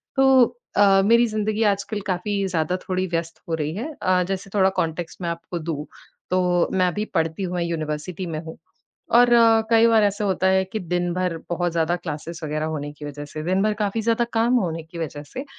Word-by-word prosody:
तो 260 -3 +4 0.2
अ, 195 -1 +6
मेरी 235 +3 +5
ज़िंदगी 215 0 -1
आज 200 0 -2
कल 205 +1 -4
काफ़ी 195 +2 -1
ज़्यादा 170 -1 0
थोड़ी 185 0 -2
व्यस्त 165 -1 -3
हो - - -1
रही 155 -1 -3
है। 250 +10 -4
अ, 185 0 +3
जैसे 195 0 -4
थोड़ा 190 -2 +4
कॉन्टेक्स्ट 165 +2 -3
मैं 170 - -2
आपको 170 +1 -5
दूँ, 155 -2 -4 0.4
तो 180 -1 +2
मैं 185 -1 +3
अभी 205 +5 -2
पढ़ती 165 +2 0
हूँ, 180 -1 -3
मैं 175 - 0
यूनिवर्सिटी 165 +2 -3
में 160 -3 -4
हूँ। 160 0 -9 0.6
और 245 0 +6
अ, 230 -1 +6
कई 230 0 +6
बार 225 -1 +5
ऐसा 205 +1 0
होता 190 -1 +1
है 190 0 +3
कि 190 +4 -5
दिन 175 0 -1
भर 180 -2 -1
बहुत 175 0 -1
ज़्यादा 165 +1 +1
क्लासेस 165 -1 -6
वग़ैरह 155 0 -2
होने 145 -2 -4
की 150 0 -11
वज़ह 145 0 -6
से, 155 +1 -7
दिन 185 +3 +1
भर 215 +1 +2
काफ़ी 205 +2 -1
ज़्यादा 230 +1 +2
काम 230 +2 +2
होने 165 -4 -2
की 165 +2 -11
वज़ह 150 -3 -5
से, 265 - -5
180 Hz, 215 wpm, -23 LUFS, 165-205 Hz, 0.6 s, अ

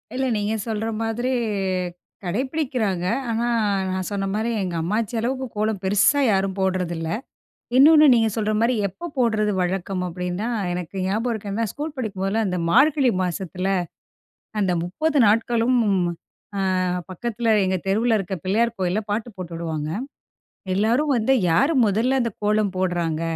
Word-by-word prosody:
இல்லை, 265 +1 0
நீங்க 210 +1 -1
சொல்ற 220 0 -2 0.2
மாதிரி 235 +3 -1 0.9
கடைப்பிடிக்கிறாங்க, 240 - -1 0.2
ஆனா 230 +1 0 0.4
நான் 185 0 -2
சொன்ன 200 -1 -2
மாரி 220 +2 -1
எங்க 180 -2 -3
அம்மாச்சி 215 +7 -1
அளவுக்கு 260 +3 -2
கோலம் 215 -1 0
பெருசா 205 +9 +3
யாரும் 195 0 0
போடுறதில்லை. 180 -3 -1 0.6
இன்னொன்னு, 305 +3 +8
நீங்க 225 -2 +3
சொல்ற 215 -1 0
மாரி 235 +2 +3
எப்ப 340 - -8
போடுறது 220 -4 +2
வழக்கம் 185 +1 -2
அப்படின்னா, 180 +4 -3 0.3
எனக்கு 180 +1 -5
ஞாபகம் 220 +6 0
இருக்கு. 210 -2 -5
ஏன்னா 225 +3 0
ஸ்கூல் 300 +1 -5
படிக்கும்போதெல்லாம் 210 -2 -1
இந்த 180 -1 -1
மார்கழி 275 - +4
மாசத்தில 185 +1 -3 0.9
அந்த 190 -3 +2
30 290 - 0
நாட்களும், 230 +3 +2 0.8
அ - - 0 0.5
பக்கத்தில 230 +5 -3 0.2
எங்க 190 0 +1
தெருவுல 225 +4 +2
இருக்க 195 -1 -3
பிள்ளையார் 230 +5 +1
கோயில்ல 185 +3 +1
பாட்டு 220 +3 -1
போட்டு 180 -2 -7
விடுவாங்க. 160 -2 -3 0.8
எல்லாரும் 235 +10 +2
வந்து 235 +4 +2 0.2
"யாரு 225 - +3
மொதல்ல 225 +6 +2
அந்த 230 -1 -1
கோலம் 210 -1 +2
போடுறாங்க" 175 -3 -1
210 Hz, 135 wpm, -23 LUFS, 185-235 Hz, 0.9 s, இன்னொன்னு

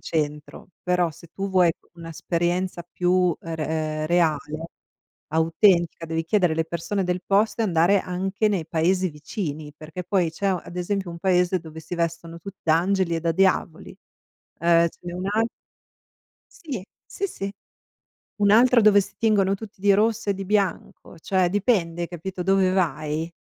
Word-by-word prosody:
centro. 150 0 -4
Però, 180 -2 +1
se 170 - -14
tu 195 0 -3
vuoi 180 -3 +4 0.3
un'esperienza 175 +2 -2
più, 180 -1 +2
ehm, 165 -1 -6
re 155 0 -2
reale, 160 -1 0 0.6
autentica, 165 +1 +2
devi 165 0 -1
chiedere 180 0 +2
alle 160 0 0
persone 170 +4 -2
del 180 0 -1
posto 210 +3 +2
e - - +3
andare 180 +1 +3
anche 190 +4 -1
nei 195 -6 0
paesi 180 +4 +1
vicini, 150 -1 -6
perché 160 +3 -8
poi 180 -3 +1
c'è 195 +4 -1
u 180 - -2
ad 175 - -11
esempio, 190 0 -2
un 170 - -8
paese 180 0 +2
dove 160 -1 -10
si 175 +2 -6
vestono 170 0 -3
tut 195 +3 -9
da 160 0 +4
angeli 185 -1 +1
e 165 - -3
da 165 0 0
diavoli. 185 -3 +1 0.7
Ehm, 170 0 +4
ce - - -23
n'è 175 0 -6
un'al 205 +5 0 1.2
Sì. 255 - -4 0.3
Sì, 395 - -3
sì. 195 - -5 0.9
Un'altra 230 +4 +6
dove 205 -1 +6
si - - -10
tingono 205 -4 +2
tutti 205 -1 -11
di 200 -1 +5
rosso 220 +1 +1
e - - +3
di 195 0 -6
bianco, 200 -3 -2
cioè, 185 +1 +1
dipende, 185 -5 +1
hai 170 - -2
capito, 180 +1 -6
dove 195 0 +3
vai. 160 -2 -1
180 Hz, 160 wpm, -24 LUFS, 165-195 Hz, 1.2 s, Un'altra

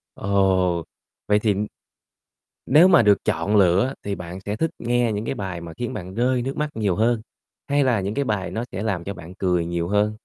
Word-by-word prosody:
Ồ, 95 -3 +1 0.4
vậy 105 - +4
thì 105 -1 +1 1.1
nếu 165 +5 +6
mà 175 - +6
được 105 -2 +3
chọn 85 +7 0
lựa 100 +7 +4
thì 100 -1 -2
bạn 90 +1 -7
sẽ 100 +2 -4
thích 165 +8 0
nghe 120 0 +1
những 105 +2 -3
cái - - -2
bài 95 -3 -5
mà 85 -1 -8
khiến 120 0 -3
bạn 90 +1 -7
rơi 125 +1 +1
nước 135 +3 -4
mắt 150 0 -1
nhiều 105 -5 0
hơn, 115 +2 +2 0.5
hay 145 0 +2
là 120 -6 +2
những 100 +2 -3
cái 140 +2 -1
bài 105 -5 -2
nó 115 - -3
sẽ 100 - -4
làm 95 -6 -1
cho 100 - -5
bạn 85 -1 -11
cười 90 -3 0
nhiều 85 0 -2
hơn? 105 +2 +1
105 Hz, 215 wpm, -23 LUFS, 90-120 Hz, 1.1 s, nếu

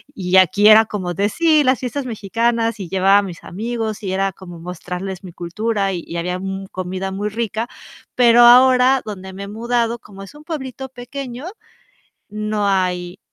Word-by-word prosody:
y 185 -1 +1
aquí 200 +3 +5
era 220 +1 +8
como 185 -5 -4
de: 200 +4 0
"¡Sí!, 315 +2 +3
las 260 -2 +2
fiestas 255 +1 -4
mexicanas", 230 +1 -1
y 180 -4 -6
llevaba 195 +1 +4
a - - +1
mis 180 -4 -8
amigos 220 +2 -4
y 195 - -4
era 195 +1 0
como 175 -1 -12
mostrarles 180 +2 -6
mi 180 - -9
cultura 195 +3 -2
y 170 - -4
y 170 - -5
había, 180 +2 -2
mm, 195 +1 -5
comida 185 +1 -4
muy 205 +2 -3
rica. 225 +1 -3 0.5
Pero 240 -1 +6
ahora 255 +2 +6
donde 190 -3 -7
me 195 +1 -7
he - - -7
mudado, 235 +2 -1
como 195 -2 -12
es 195 - -12
un 295 +1 -14
pueblito 265 -4 -6
pequeño, 255 +2 -7 0.8
no 210 -1 -2
hay, 180 -1 -1
205 Hz, 180 wpm, -19 LUFS, 190-240 Hz, 0.8 s, era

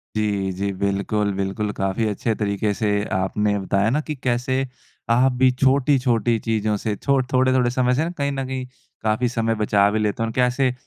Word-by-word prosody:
जी, 100 -3 0
जी। 100 +2 -2
बिल्कुल, 100 +1 -1
बिल्कुल। 100 +2 -2
काफ़ी 95 +3 0
अच्छे 105 +2 -1
तरीके 100 0 -1
से 105 +1 -2 0.3
आपने 100 +2 0
बताया 100 +2 +1
ना 145 +6 +1
कि 155 - -3
कैसे 125 0 -1 0.5
आप 125 +3 +4
भी 130 - +7
छोटी-छोटी 130 -3 +2
चीज़ों 110 -1 +1
से 105 0 -2
छो 140 +5 +1
थोड़े 130 -1 +3
समय 125 0 +1
से 160 +5 0
कहीं 140 -1 0
न 135 -1 -3
कहीं 130 -1 -4 0.4
काफ़ी 110 +3 +1
समय 115 -2 0
बचा 105 -2 +3
भी 110 - 0
लेते 105 +1 -1
हैं - - 0
और 115 - -5
कैसे 125 +1 +2
115 Hz, 180 wpm, -22 LUFS, 105-130 Hz, 0.5 s, भी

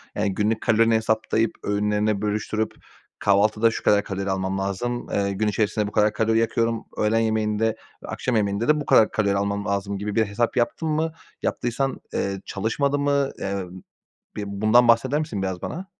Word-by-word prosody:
Yani, 100 -2 0
günlük 110 +1 0
kalorini 115 +1 +3
hesaplayıp 110 0 +1
öğünlerine 105 0 0
bölüştürüp, 105 +1 -1 0.5
"Kahvaltıda 105 +3 +3
şu - - -5
kadar 105 0 +4
kalori 100 0 -4
almam 95 0 -1
lazım, 100 +6 -3
eee, 100 -1 0
gün 105 +2 -1
içerisinde 105 0 0
bu - - -6
kadar 105 0 +2
kalori 110 +1 +1
yakıyorum, 115 0 0
öğlen 110 +1 +2
yemeğinde 110 -1 +1 0.4
ve - - -8
akşam 125 - -2
yemeğinde 100 +1 0
de 150 0 +4
bu - - -6
kadar 110 - +5
kalori 100 -2 +1
almam 100 +1 -1
lazım." 100 0 -2
gibi 105 +1 -4
bir 110 -1 +3
hesap 110 +4 -1
yaptın 125 +7 0
mı? 160 +1 0 0.3
Yaptıysan, 125 +3 -1
eee, 100 -1 -2
çalışmadı 140 +8 -1
mı? 140 -1 +1
Emm, 95 -2 -4 0.6
bir 105 - -3
bundan 110 +5 +3
bahseder 130 +5 +3
misin 110 -11 -3
biraz 95 -2 -3
bana? 185 +4 -5
110 Hz, 175 wpm, -24 LUFS, 100-115 Hz, 0.6 s, kadar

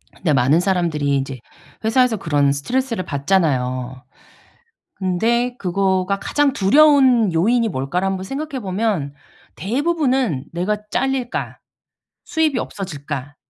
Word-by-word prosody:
근데 160 -5 0
많은 135 +5 +3
사람들이 170 -7 0
이제 135 -1 -4 0.4
회사에서 235 +1 +2
그런 145 -6 +1
스트레스를 230 - -2
받잖아요. 130 -5 -1 0.9
근데 235 +7 0
그거가 190 +1 0
가장 290 +5 +1
두려운 260 - +4
요인이 230 +8 +2
뭘까를 170 +4 -2
한번 190 -1 -2
생각해 275 +6 -5
보면 190 -7 -1 0.4
대부분은 260 - 0
'내가 185 +5 -1
짤릴까? 265 -1 -2 0.7
수입이 310 -6 0
없어질까?' 145 -6 -6
190 Hz, 285 characters per minute, -20 LUFS, 145-245 Hz, 0.9 s, 두려운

